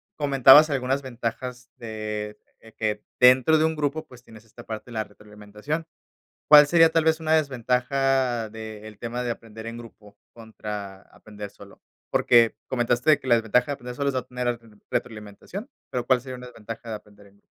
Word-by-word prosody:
comentabas 140 +1 +7
algunas 135 0 -1
ventajas 125 0 -5
de, 105 -2 -5 0.2
eh, 110 -1 -17
que 105 -1 -2 0.2
dentro 130 +5 +6
de 155 - +3
un 160 0 0
grupo, 150 +1 -2
pues, 125 -1 -16
tienes 110 0 -16
esta 120 +1 -14
parte 110 -1 -6
de - - -9
la 110 - -1
retroalimentación, 105 +9 -7 0.6
¿cuál 150 -1 +9
sería 165 +1 +5
tal 165 -1 +2
vez 160 0 +3
una 160 -1 -1
desventaja 130 -3 0
de 110 -1 -9
el 105 -2 -12
tema 120 +1 -4
de 120 - -2
aprender 110 -1 -11
en 115 +1 -6
grupo, 105 -3 -14 0.2
contra 105 -4 -8
aprender 105 -1 -10
solo? 100 0 -16 0.3
Porque 115 -2 +4
comentaste 120 +3 +1
de 150 - +5
que - - -13
la 120 - +5
desventaja 115 +2 +2
de 145 - -3
aprender 125 -3 -7
solo 140 +1 0
es - - -6
no 130 - +1
obtener 125 -1 -3 0.3
retroalimentación, 110 - -5 0.2
pero, 125 -1 -3
¿cuál 130 -1 +3
sería 130 0 -8
una 125 - -10
desventaja 115 -1 -9
de - - -3
aprender 105 -1 -13
en 100 0 -23
grupo? - - -34
120 Hz, 190 wpm, -25 LUFS, 110-135 Hz, 0.6 s, cuál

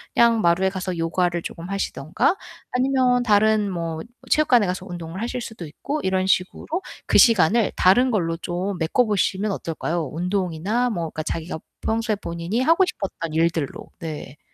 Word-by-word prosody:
그냥 230 -2 +5
마루에 175 +3 +3
가서 185 -2 -4
요가를 175 +1 0
쪼끔 170 +3 -7
하시든가 195 - 0 0.4
아니면 255 -1 +2
다른 215 -1 +3
뭐 165 -2 -3 0.3
체육관에 250 -8 +4
가서 185 +1 -3
운동을 175 +2 -6
하실 245 +1 -3
수도 220 -8 -7
있고 285 - -4
이런 190 0 +1
식으로 185 -1 0 0.4
그 - - +4
시간을 225 - +5
다른 245 +8 +5
걸로 165 -6 0
좀 180 +3 -3
메꿔 170 +10 +2
보시면 205 0 0
어떨까요? 165 -2 -3
운동이나 185 +6 0
뭐 170 -5 -2
그러니까 155 - -5
자기가 165 0 -4 0.2
평소에 225 -1 0
본인이 175 +5 -3
하고 330 +7 +4
싶었던 185 - -5
일들로. 165 -3 -1
네. 150 -3 -7
185 Hz, 360 characters per minute, -23 LUFS, 170-225 Hz, 0.4 s, 그냥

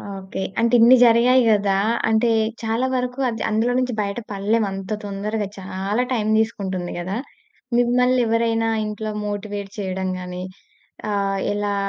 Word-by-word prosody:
Okay. 190 0 -6 0.2
అంటే, 235 +1 +2
ఇన్ని 235 +3 +8
జరిగాయి 245 +2 +5
గదా! 200 -2 +2 0.3
అంటే, 225 +2 +3 0.3
చాలా 225 +3 0
వరకు 250 +1 -2
అద్ 225 -1 -5
అందులో 225 +3 +1
నుంచి 255 -1 -1
బయట 200 +2 -3
పడలేం 205 +3 +1
అంత 195 +1 -6
తొందరగా. 205 +1 -3
చాలా 195 +4 -2
టైమ్ 215 -3 0
తీసుకుంటుంది 190 -5 -2
గదా! 185 +4 -3 0.6
మిమ్మల్నెవరైనా 235 -2 +2 0.2
ఇంట్లో 215 0 -4 0.2
మోటివేట్ 205 -1 -5
చెయడం 190 -1 -2
గానీ 180 0 -6 0.7
ఆహ్, 195 -1 0
ఎలా 205 0 -1
215 Hz, 130 wpm, -22 LUFS, 195-230 Hz, 0.7 s, ఇన్ని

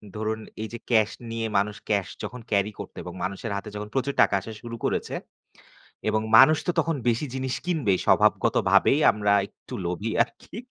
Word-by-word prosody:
ধরুন 110 +1 -2 0.2
এই 110 - -3
যে 120 - -5
cash 110 -2 +3 0.2
নিয়ে 115 0 -2
মানুষ 105 +1 0
cash 100 -3 +1
যখন 125 0 -6
carry 100 0 +2
করত - - -7
এবং 90 - -7
মানুষের 95 +4 -4
হাতে 100 +1 -5
যখন 105 0 -5
প্রচুর 135 +1 0
টাকা - - +4
আসা 105 +4 -8
শুরু 115 -1 -7
করেছে - - -1 0.9
এবং 110 0 +2 0.2
মানুষ 135 +6 +8
তো - - +3
তখন 165 -2 +1
বেশি 120 +5 +1
জিনিস 130 -1 -2
কিনবে 155 - +1
স্বভাবগতভাবেই 140 - +4
আমরা 105 -1 +1
একটু - - -13
লোভী 90 +6 -2
আরকি। - - -10
110 Hz, 175 wpm, -25 LUFS, 100-125 Hz, 0.9 s, মানুষ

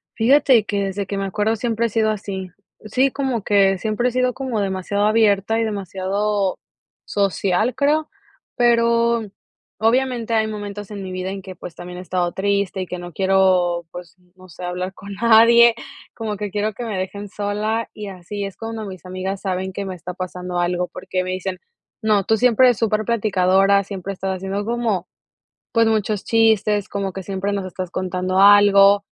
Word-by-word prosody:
Fíjate 255 -2 +4
que 200 -1 -1
desde 195 +1 -3
que 200 +1 -4
me 195 - -2
acuerdo 210 +3 0
siempre 230 0 -1
he - - -7
sido 220 0 +1
así, 195 -3 -4 0.4
sí 260 +5 +2
como 260 -7 -2
que 195 -2 +3
siempre 220 +5 0
he - - -7
sido 255 0 +1
como 255 -5 -3
demasiado 195 +1 -1
abierta 215 0 +3
y - - +1
demasiado 200 -1 -1 0.5
social 200 +3 0
creo, 300 +2 +1 0.5
pero 235 -1 +3 0.6
obviamente 235 0 +1
hay 220 -1 +2
momentos 205 -1 -6
en 200 -2 -7
mi 185 - -6
vida 185 0 -4
en 195 -1 -6
que, 185 -2 -9
pues, 165 0 -10
también 180 +1 -8
he - - -6
estado 180 -1 -1
triste 200 0 -1
y 185 - -5
que 180 - -5
no 175 -1 -9
quiero, 185 -2 +2
pues, 175 -1 -10 0.2
no 185 0 -16
sé, 175 - -11
hablar 180 +1 -3
con 200 0 -9
nadie 230 +2 +6 0.4
como 220 -2 -4
que 205 0 -4
quiero 210 +2 -2
que 240 - -6
me 215 -4 -3
dejen 200 +2 -5
sola, 210 +3 -2
y 210 -1 -7
así 195 +2 -6
es 195 -1 -6
cuando 225 -1 -5
mis 185 -2 -9
amigas 185 +1 -4
saben 190 -1 -2
que 200 +1 -5
me 190 - -4
está 180 +1 -8
pasando 180 -1 -4
algo 175 0 0
porque 185 0 -3
me 185 - -5
dicen: 185 0 -4 0.4
"No, 215 -3 +2
tú 220 +3 +2
siempre 250 +1 +4
eres 245 - +3
súper 215 -1 0
platicadora, 200 -3 +3
siempre 195 0 -6
estás 190 0 -3
haciendo 195 +2 -3
como, 225 -6 -1 0.7
pues, 230 -1 +3
muchos 215 -2 0
chistes, 215 -3 +2
como 195 -2 -3
que 190 - -5
siempre 195 +1 -3
nos 195 -2 -2
estás 185 -1 -6
contando 185 0 -2
algo," 200 0 +6
200 Hz, 185 wpm, -21 LUFS, 185-220 Hz, 0.7 s, nadie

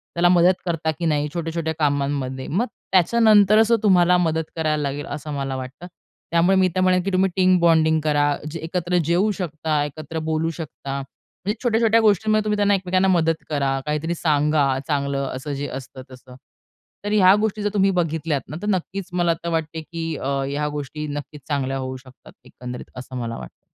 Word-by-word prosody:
त्याला 175 +1 +4
मदत 180 +1 +5
करता, 165 -2 -1
की 170 +2 -5
नाही 150 -2 +1
छोट्या-छोट्या 165 -1 -2
कामांमध्ये. 140 -3 -1
मग 205 +10 0 0.3
त्याच्यानंतरच 215 +3 +5
तो 230 - +5
तुम्हाला 180 -3 +5
मदत 160 -2 +1
करायला 155 -2 0
लागेल 145 +1 -3
असं 150 0 -5
मला 135 -1 -3
वाटतं. 130 +7 -7 0.4
त्यामुळे 170 +3 +4
मी 190 -1 +4
तर 185 - +2
म्हणेल, 185 0 +3
की 195 - -2
तुम्ही 190 +1 +3
टीम 185 -1 +4
बॉन्डिंग 160 -2 +4
करा. 145 -1 +2 0.2
जे 165 - -5
एकत्र 175 +2 -1
जेवू 180 +6 +2
शकता. 160 -5 -2
एकत्र 155 +2 -6
बोलू 160 +1 0
शकता. 140 -3 -6
म्हणजे 185 +8 -7
छोट्या-छोट्या 230 -1 +3
गोष्टींमध्ये 215 0 +3
तुम्ही 210 0 0
त्यांना 205 0 +3
एकमेकांना 185 0 +1
मदत 165 -3 +1
करा. 140 -2 0
काहीतरी 150 +3 -2
सांगा 150 -2 +2 0.2
चांगलं 140 -2 -1
असं 145 +3 -5
जे 140 +1 -3
असतं 130 0 -8
तसं. 125 0 -13 0.7
तर 205 - -1
ह्या 195 -2 +6
गोष्टी 215 -1 -1
जर 205 - +1
तुम्ही 195 -1 +3
बघितल्यात 160 -4 -1
ना, - - -6
तर 210 - -4
नक्कीच 190 0 -2
मला 175 -1 +2
तर 170 - -2
वाटते, 160 -1 -2
की 165 0 -5
अ, 135 - -3 0.2
ह्या 145 +1 -2
गोष्टी 150 +2 -5
नक्कीच 145 0 -8
चांगल्या 135 -2 -1
होऊ 130 0 -4
शकतात. 130 0 -17
एकंदरीत 125 0 -9
असं 130 0 -7
मला 115 -1 -4
वाटतं. - - -12
160 Hz, 180 wpm, -22 LUFS, 145-185 Hz, 0.7 s, ह्या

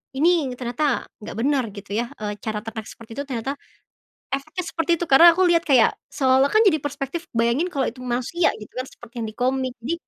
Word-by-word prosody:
ini 315 -1 +3
ternyata 245 +3 -1 0.2
gak 210 - -7
benar 265 +3 +1
gitu 200 -1 -10
ya, 235 +1 0
eee, 210 -1 -3
cara 215 -1 -2
ternak 220 -1 -6
seperti 225 0 -11
itu - - -1
ternyata 265 +1 -3 0.8
efeknya 310 +7 -3
seperti 330 -1 -1
itu 345 - -2
karena 330 +6 +9
aku 375 - +4
lihat 335 -1 +4
kayak 255 -5 +5 0.2
seolah-olah 265 0 +3
kan 430 - +4
jadi 315 -7 +4
perspektif 290 +3 -5
bayangin 235 +10 +2
kalau 275 -7 -1
itu 255 +2 -13
manusia 255 +7 0
gitu 210 - -11
kan 255 +1 -4
seperti 240 -1 -15
yang 225 - -2
di 215 - -13
komik, 255 0 0
jadi 315 - 0
265 Hz, 200 wpm, -23 LUFS, 235-305 Hz, 0.8 s, karena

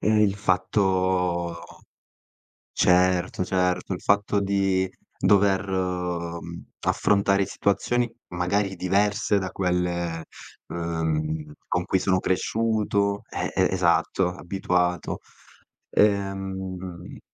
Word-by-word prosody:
e 110 0 +3
il 100 -2 +3
fatto 90 -3 +1 1.1
certo, 90 0 +3
certo, 90 0 0
il 90 - -6
fatto 100 0 +2
di 95 -1 +1 0.3
dover, 100 -1 +3
mhmm, 90 -2 -3 0.2
affrontare 100 -1 +2
situazioni 120 +5 0 0.3
magari 95 +3 0
diverse 100 +3 +1
da 95 -1 -3
quelle, 85 -3 -1 0.4
uhm, 80 -2 -2
con 90 0 0
cui 95 - +2
sono 95 0 +2
cresciuto 100 0 0
eh, - - -2
e - - +4
esatto, 90 +1 +2
abituato, 90 -2 -1 0.7
ehm 95 -3 -1
95 Hz, 90 wpm, -25 LUFS, 90-100 Hz, 1.1 s, e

